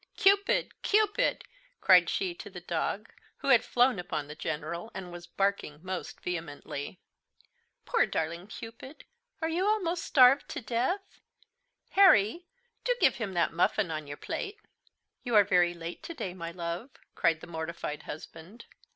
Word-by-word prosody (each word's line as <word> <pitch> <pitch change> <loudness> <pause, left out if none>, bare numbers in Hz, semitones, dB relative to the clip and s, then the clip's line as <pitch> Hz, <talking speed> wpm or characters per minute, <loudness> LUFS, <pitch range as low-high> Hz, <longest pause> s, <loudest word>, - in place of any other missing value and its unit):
"Cupid, 400 +1 +3
Cupid!" 425 +3 +2 0.4
cried - - +6
she 370 -2 -1
to 370 - -10
the - - -8
dog, - - -3 0.2
who - - -3
had 245 -4 +6
flown 245 -4 +3
upon 160 -4 -3
the 150 - -7
General, 160 +6 -4
and 185 -2 -6
was 175 0 -9
barking 195 -6 -1
most 185 -1 -5
vehemently. 160 -2 -5 0.9
"Poor 470 - +2
darling 170 +3 -3
Cupid! 230 +6 -10 0.4
are - - +2
you 335 +3 0
almost 360 -5 0
starved 265 +1 +5
to - - -4
death? 255 - -2 0.7
Harry, 345 - +5 0.4
do - - +2
give - - +4
him 205 -5 -3
that 170 -1 +1
muffin 175 +2 +1
on 155 -2 -4
your 145 0 -7
plate." 415 -1 -5 0.7
"You 240 -3 -1
are 205 - +8
very 175 -3 +3
late 170 0 -7
to 335 - -7
day, 185 - -4
my 170 -2 -6
love," 170 +7 -5 0.2
cried 165 -2 +2
the - - -10
mortified 160 -2 -5
husband. 165 +8 -10
195 Hz, 150 wpm, -29 LUFS, -, 0.9 s, are